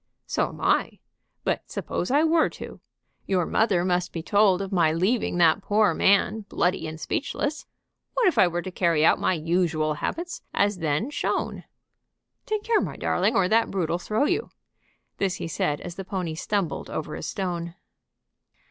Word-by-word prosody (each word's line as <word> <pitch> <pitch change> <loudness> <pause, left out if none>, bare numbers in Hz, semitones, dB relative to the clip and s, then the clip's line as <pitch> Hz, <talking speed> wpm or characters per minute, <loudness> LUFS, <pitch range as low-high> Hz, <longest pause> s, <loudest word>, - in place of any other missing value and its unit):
"So - - 0
am - - -11
I. - - +1 0.5
But - - -2
suppose 175 - -3
I 285 +4 +4
were 325 0 +3
to? - - -9 0.5
Your 185 -3 +1
mother 195 -4 +2
must 180 -1 0
be 165 - -5
told 200 -1 +4
of 195 0 -4
my 170 -5 +3
leaving 185 +4 0
that 170 +2 +4
poor 210 +1 +3
man 200 +2 +3
bloody 175 -2 0
and 160 0 -7
speechless. 290 - -3 0.5
What - - +2
if 365 - +2
I 185 - +7
were 175 0 -2
to 185 - -6
carry 170 -4 +2
out - - +4
my 185 - +1
usual 160 -1 0
habits 340 - -4
as 200 -2 +1
then 165 - -1
shown? - - -2 0.8
Take 430 -2 -1
care, 450 -1 +2
my - - -4
darling, - - +1
or 185 - +3
that 225 +1 +3
brute'll 170 -3 -1
throw 215 +9 0
you!" 370 +8 0 0.7
This 190 -2 0
he - - -5
said 150 -2 -1
as 175 - -6
the 195 - -6
pony 185 -3 -3
stumbled 195 +2 -2
over 155 -1 -4
a - - -5
stone. 175 -3 -4
185 Hz, 175 wpm, -25 LUFS, 170-215 Hz, 0.8 s, I